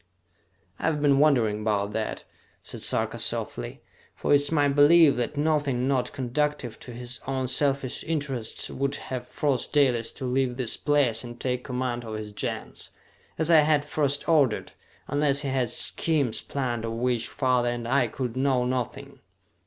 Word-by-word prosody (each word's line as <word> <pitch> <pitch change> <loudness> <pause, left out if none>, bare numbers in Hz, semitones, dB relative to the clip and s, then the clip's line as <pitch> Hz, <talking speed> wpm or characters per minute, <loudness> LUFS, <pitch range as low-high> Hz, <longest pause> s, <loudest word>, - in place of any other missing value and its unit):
"I - - -3
have 155 -2 +1
been 140 -2 +3
wondering 120 -8 +3
about 105 -1 0
that," 110 +1 -3 0.4
said - - -7
Sarka - - 0
softly, - - -2 0.3
"for - - -2
it - - +8
is 145 - -2
my 145 -3 +3
belief 145 +2 +6
that 125 +4 -2
nothing 145 -4 +1
not 130 -2 0
conducive 135 -2 -2
to 125 - -9
his 120 0 -6
own 130 -1 -1
selfish 135 0 +1
interests 140 -8 -2
would 140 +1 -1
have 130 -2 -6
forced 140 -5 -1
Dalis 125 -6 +2
to 130 - -6
leave 125 -1 0
this 120 -3 0
place 140 -7 +1
and 120 0 -9
take 125 -1 -2
command 125 -2 -3
of 110 -1 -6
his 105 -1 -6
Gens, 100 - -4 0.5
as 160 +1 +1
I 160 - +8
had 150 -1 +2
first 145 -1 -1
ordered, 145 -9 +2 0.4
unless 145 -1 +2
he 140 - -3
had 130 -3 0
schemes 145 -4 +1
planned 120 -5 -3
of 115 0 -3
which 120 0 0
father 125 -2 +1
and 120 -1 -4
I 130 0 +2
could 125 0 -4
know 130 -2 +1
nothing. 125 -2 -4
130 Hz, 170 wpm, -26 LUFS, 120-145 Hz, 0.5 s, it